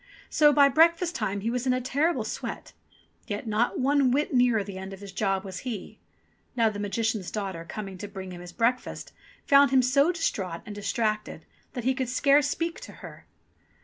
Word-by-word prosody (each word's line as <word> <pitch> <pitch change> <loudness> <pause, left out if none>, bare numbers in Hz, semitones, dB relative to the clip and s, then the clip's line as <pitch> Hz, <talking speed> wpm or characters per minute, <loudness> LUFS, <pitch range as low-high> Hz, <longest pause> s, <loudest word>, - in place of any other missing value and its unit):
So 295 -1 +5
by 285 -1 +6
breakfast 335 +5 +3
time 205 -7 -2
he 225 +3 -1
was 250 +1 -2
in 255 - +3
a 255 - 0
terrible 285 +7 0
sweat; - - -6 0.5
yet 205 +3 -4
not 220 +2 0
one 275 0 +3
whit 285 +4 0
nearer 245 -4 +3
the 195 -1 -8
end 190 +1 -7
of 195 - -10
his 200 -1 -9
job 195 -1 -1
was 190 -2 -6
he. 230 -7 -6 0.6
Now 230 -2 +3
the 205 - -7
Magician's 210 -1 -1
daughter 195 -5 -4
coming 195 +2 -7
to 205 - -5
bring 190 -2 -8
him 175 -1 -8
his 175 0 -9
breakfast, 240 +5 -1 0.3
found 280 -1 +6
him 260 0 +4
so 280 +6 +3
distraught 190 - -2
and 210 - -7
distracted 215 +1 -2 0.3
that 245 -4 -4
he 260 +2 +2
could 260 -2 -3
scarce 280 +2 +4
speak 335 0 -2
to - - -10
her. - - -12
230 Hz, 195 wpm, -27 LUFS, 200-275 Hz, 0.6 s, by